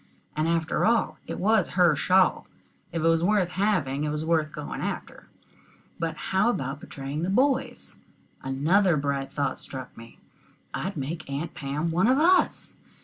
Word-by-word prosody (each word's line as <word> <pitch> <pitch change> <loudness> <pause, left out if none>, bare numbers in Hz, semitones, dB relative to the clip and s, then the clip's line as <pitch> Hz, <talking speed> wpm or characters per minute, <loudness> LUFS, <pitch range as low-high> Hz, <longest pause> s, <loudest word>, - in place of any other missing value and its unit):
And, 155 +1 0
after 165 -1 0
all, 230 0 +2
it - - -4
was 210 -1 +2
her 175 -4 +5
shawl. 185 +6 +3 0.4
If 165 -1 -2
it - - +3
was 165 0 +3
worth 195 -2 +2
having, 180 -8 0
it 150 - -1
was 150 +1 -3
worth 160 -2 +1
going 65 - -6
after. - - -5 0.7
But 165 -1 -2 0.2
how 195 +5 +4
about 135 - -2
betraying 140 +2 -6
the 175 - -1
boys? 265 +6 0 0.4
Another 155 +7 +2
bright 140 -1 -2
thought 140 -2 -2
struck 130 -2 -8
me. 115 0 -13 0.6
I'd 190 -1 -3
make 145 +3 -5
Aunt 145 +4 -4
Pam 150 +4 -3
one 180 +6 +2
of 260 +2 +4
us. 360 +5 +2
165 Hz, 160 wpm, -26 LUFS, 140-190 Hz, 0.7 s, her